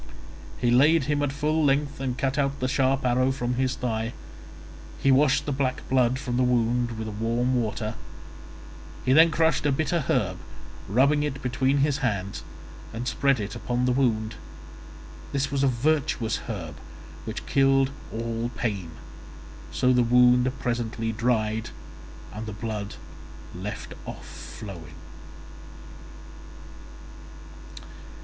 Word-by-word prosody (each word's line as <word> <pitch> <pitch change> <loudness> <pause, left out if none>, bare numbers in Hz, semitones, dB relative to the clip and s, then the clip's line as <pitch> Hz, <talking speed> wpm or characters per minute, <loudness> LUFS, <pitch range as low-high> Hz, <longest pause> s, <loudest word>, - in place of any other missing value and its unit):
He 120 -1 +1
laid 150 +5 +5
him 145 +1 0
at 145 -1 0
full 155 +2 0
length 140 0 +1
and 130 -2 -2
cut 135 0 0
out 140 0 0
the 130 - 0
sharp 135 0 +1
arrow 130 +1 +3
from 125 -2 -2
his 130 +1 0
thigh; 115 -2 -2 0.8
he 135 - +3
washed 140 +1 +4
the 145 - -1
black 130 -1 -1
blood 130 -1 +3
from 125 -2 -3
the 130 - +3
wound 120 -1 +1
with 110 0 -4
warm 115 +4 0
water; 110 0 -3 1.1
he 130 - +4
then 160 +3 +7
crushed 160 -2 +2
a 145 - +2
bitter 160 +5 +1
herb, - - +1 0.5
rubbing 140 +8 +3
it 145 -2 -3
between 130 +2 +1
his 145 -2 0
hands, 100 -5 -2 0.5
and 120 +2 -4
spread 140 -2 +2
it 100 0 -4
upon 125 0 -1
the 125 - +2
wound; 120 -3 +1 1.0
this 140 0 0
was 140 -1 0
a - - +5
virtuous 130 -3 +1
herb 80 - -5 0.5
which - - -5
killed 135 0 +3 0.2
all 115 +1 -2
pain; 100 -8 -2 0.8
so 130 0 +3
the 125 - +4
wound 125 +1 +5
presently 120 -3 -2
dried 110 -1 0 0.6
and 110 +1 -6
the 110 - -5
blood 105 -1 -4 0.6
left 95 +4 -6
off - - -7
flowing. 90 -7 -9
125 Hz, 135 wpm, -26 LUFS, 115-135 Hz, 1.1 s, then